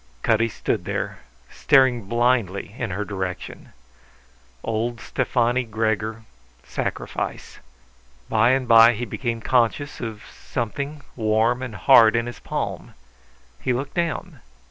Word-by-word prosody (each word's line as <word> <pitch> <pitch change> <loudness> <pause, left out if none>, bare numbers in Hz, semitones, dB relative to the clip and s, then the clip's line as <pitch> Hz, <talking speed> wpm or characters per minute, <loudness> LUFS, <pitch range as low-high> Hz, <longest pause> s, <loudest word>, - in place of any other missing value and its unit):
Cutty 115 +1 +2
stood - - -2
there, - - -3 0.3
staring 130 -5 +3
blindly 120 -4 0
in 115 -3 -3
her 100 +3 -3
direction. 95 -3 -6 0.9
Old 115 +2 -2
Stefani 120 +1 0
Gregor; 110 0 -2 0.4
sacrifice. - - -4 0.7
By 110 +2 +3
and 130 -1 +1
by 115 +1 +8
he 120 +2 -4
became 115 +1 -3
conscious 125 +4 +1
of 110 -3 -6 0.2
something 140 +5 -4
warm 115 +2 +1
and 125 -5 -5
hard 110 +4 +6
in 115 0 +1
his 120 - -7
palm. - - -4 0.7
He 130 - 0
looked 135 +3 -4
down. 170 -2 -2
115 Hz, 120 wpm, -23 LUFS, 110-125 Hz, 0.9 s, by